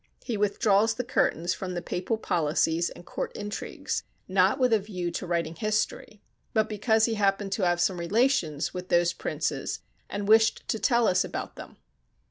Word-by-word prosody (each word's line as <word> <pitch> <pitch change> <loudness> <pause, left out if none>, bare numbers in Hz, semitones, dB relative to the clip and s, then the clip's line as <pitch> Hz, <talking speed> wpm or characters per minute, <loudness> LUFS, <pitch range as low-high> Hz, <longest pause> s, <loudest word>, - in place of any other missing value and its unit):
He 240 - -3
withdraws 210 +1 +2
the 250 - -2
curtains 175 -7 +1
from 185 0 -5
the 175 - -2
Papal 185 +5 -2
policies 165 -2 +1
and 175 - -12
court - - -4
intrigues, 205 0 -4 0.3
not - - +3
with 250 -2 +3
a 220 - +5
view 185 -4 -4
to 175 +2 -5
writing 170 -2 -1
history, 215 +2 -2 0.3
but 220 -1 +3
because 220 +1 +2
he 230 - 0
happened 200 -1 +1
to 190 -2 +1
have 175 0 +1
some 175 0 +1
relations 175 - +1
with 180 0 -6
those 175 0 +3
princes - - -3 0.3
and 205 0 -4
wished 220 +1 +4
to 220 - 0
tell 235 -2 +3
us 180 - +3
about - - -5
them. - - -11
200 Hz, 175 wpm, -27 LUFS, 175-220 Hz, 0.3 s, a